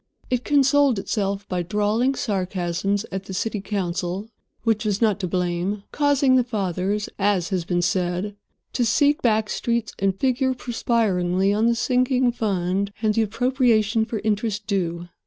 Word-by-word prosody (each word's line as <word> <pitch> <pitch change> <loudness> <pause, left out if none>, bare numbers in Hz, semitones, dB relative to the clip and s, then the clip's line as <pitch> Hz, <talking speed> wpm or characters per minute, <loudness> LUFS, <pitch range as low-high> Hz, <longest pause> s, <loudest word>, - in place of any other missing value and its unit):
It 250 -1 0
consoled 280 -3 +3
itself 195 0 -2
by 180 -1 -1
drawling 210 +8 +1
sarcasms 195 0 -1
at 190 0 -4
the 190 - -6
city 210 +1 -2
council 190 +1 -3 0.3
which 225 -1 +1
was 205 -2 0
not 215 -3 +2
to 185 - -2
blame, 180 +3 -1
causing 280 -3 +3
the 250 - +4
fathers, 200 -2 -2
as 195 -3 +1
has 185 -4 -1
been 175 0 0
said, 180 +3 -1 0.4
to 245 - +1
seek 285 +6 +3
back 220 -2 +2
streets 235 0 -2
and 195 -1 0
figure 260 0 +1
perspiringly 200 -6 0
on 220 +2 +2
the 235 - +3
sinking 250 +1 +2
fund 195 -3 -1
and 215 -1 +3
the 225 - +2
appropriation 225 -1 +2
for 225 0 -4
interest 210 -1 -1
due. 175 -4 -2
210 Hz, 155 wpm, -23 LUFS, 190-235 Hz, 0.4 s, the